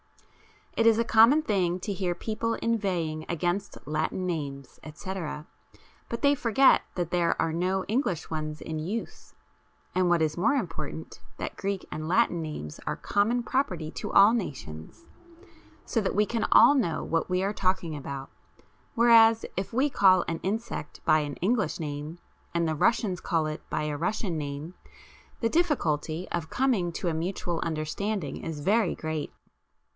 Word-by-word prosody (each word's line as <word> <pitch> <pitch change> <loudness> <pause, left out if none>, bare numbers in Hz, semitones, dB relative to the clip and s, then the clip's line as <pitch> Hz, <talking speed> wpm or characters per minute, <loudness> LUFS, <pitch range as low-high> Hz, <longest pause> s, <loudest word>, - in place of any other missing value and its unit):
It 230 - +3
is 225 -1 +6
a 230 - +3
common 230 +7 +6
thing 185 - 0
to 205 - -3
hear 180 -2 -1
people 230 +3 -2
inveighing 180 -9 -1
against 175 +4 -2
Latin 155 +5 -1
names, 140 -6 -5
etc., 155 -2 -6 0.6
but 235 - -5
they 285 0 +6
forget 260 0 +4
that 175 -2 -2
there 175 -1 +1
are 165 -1 +1
no 185 +3 0
English 205 - -1
ones 155 -1 -4
in 160 -1 -4
use, 200 +9 -5 0.6
and 185 -1 +2
what 170 -2 +3
is 155 0 -1
more 230 +10 +3
important, 165 - -4 0.2
that - - -5
Greek 200 -1 -3
and 155 0 -4
Latin 175 -1 +2
names 150 - -6
are - - 0
common 230 +4 +1
property 185 - -1
to - - -5
all 200 +3 +7
nations, 135 - -5 0.8
so 225 - 0
that 195 - -1
we 210 +1 +4
can 230 +1 -1
all 235 +5 +8
know 220 - 0
what 165 +1 -1
we 180 +1 +1
are 200 +2 0
talking 185 -5 0
about, 140 -1 -6 0.6
whereas 230 -1 +6
if 190 +1 -3
we 260 +5 +2
call 190 -9 +4
an 165 - -2
insect 205 -5 -4
by 155 - +5
an 145 -2 -3
English 215 +2 0
name 150 +1 -5 0.4
and 170 -1 +2
the 160 - 0
Russians 195 +1 +1
call 165 -4 0
it 155 0 -4
by - - -1
a 150 -1 -2
Russian 180 +2 -1
name, 145 +2 -5 0.7
the 230 - +2
difficulty 175 - 0
of 165 -2 -3
coming 240 -10 +1
to 180 - -3
a - - -1
mutual 170 0 -2
understanding 160 +2 -2
is 160 -3 -6
very 205 +3 +2
great. 155 -2 -4
180 Hz, 160 wpm, -27 LUFS, 155-220 Hz, 0.8 s, all